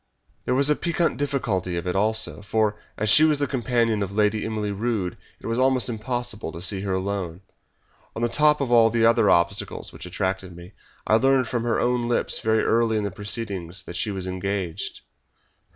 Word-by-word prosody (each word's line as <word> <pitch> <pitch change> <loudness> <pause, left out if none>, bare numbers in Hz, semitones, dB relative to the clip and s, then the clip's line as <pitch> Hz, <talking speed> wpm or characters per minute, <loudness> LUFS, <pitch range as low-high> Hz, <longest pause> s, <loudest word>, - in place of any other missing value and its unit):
There - - +1
was 140 +2 +4
the 150 - +4
piquant 170 +1 0
difficulty 120 -11 -1
of 85 - -4
it 90 - -2
also, 110 +1 0
for, 105 +1 0 0.2
as 110 - -1
she 150 +8 +6
was 155 -2 +4
the 145 - 0
companion 120 -5 0
of 100 -1 -2
Lady 105 +1 +1
Emily 110 -2 -2
Rood, 100 -3 -2 0.2
it - - -14
was 115 +2 -1
almost 130 -1 +3
impossible 115 -4 -4
to 85 - -7
see 95 +2 -1
her 95 -1 -2
alone. 95 -2 -3 0.7
On 115 - -3
the - - +3
top 150 +4 +3
of 130 -3 -1
all 115 -2 +6
the 115 0 +2
other 115 -2 +4
obstacles 85 0 0
which - - -9
attracted 95 0 -3
me, 85 +2 -12 0.3
I 110 - +4
learned 135 0 +3
from 120 0 -1
her 115 -2 +1
own 120 -1 +1
lips 120 - 0
very 110 0 +1
early 115 -1 +2
in 105 - -1
the 100 - -2
proceedings 100 -4 -4
that 85 - -9
she 100 - -1
was 95 -2 -4
engaged." 95 -2 -3
110 Hz, 200 wpm, -24 LUFS, 95-120 Hz, 0.7 s, she